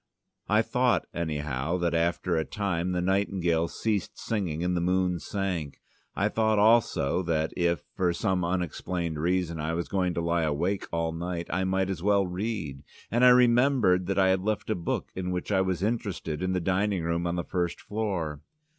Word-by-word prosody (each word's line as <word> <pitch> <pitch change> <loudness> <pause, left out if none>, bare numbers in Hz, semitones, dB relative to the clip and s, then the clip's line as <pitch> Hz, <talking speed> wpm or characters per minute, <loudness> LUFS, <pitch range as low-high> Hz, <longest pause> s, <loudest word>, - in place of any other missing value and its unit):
I 105 +2 +4
thought, 125 -6 +1
anyhow, 75 -1 -2
that 85 -1 0
after 85 +1 +1
a 80 - +1
time 90 -2 -2
the 90 -1 -1
nightingales 90 -3 0
ceased 105 -5 -1
singing 90 -7 -2
and 90 0 0
the 85 - 0
moon 90 0 +1
sank. 90 -8 -3 0.4
I 100 - +2
thought 110 0 +1
also 105 -7 +3
that 80 -3 -1
if, 85 -3 +1
for 90 -2 +2
some 90 +1 0
unexplained 85 -1 -2
reason, 85 0 0
I 80 +2 -1
was 85 - -2
going 90 -3 0
to 85 - 0
lie 85 0 +1
awake 80 +6 -1
all 85 -1 0
night, 85 +1 -4
I 95 +2 0
might 95 0 0
as 90 -4 -4
well 100 0 +3
read, 90 -7 -4 0.3
and 120 +3 +2
I 125 - +9
remembered 120 -6 +4
that 95 - -1
I 95 -1 +4
had 95 0 +2
left 110 +1 -2
a - - +1
book 85 -2 -3
in 90 -1 -3
which 90 +2 -3
I 95 -2 +3
was 95 -1 -1
interested 100 -8 -2
in 95 0 0
the 90 - +1
dining 95 +1 0
room 85 +1 -1
on 85 - -1
the 85 - -2
first 90 -2 -2
floor. 95 -9 -3
90 Hz, 190 wpm, -28 LUFS, 85-100 Hz, 0.4 s, I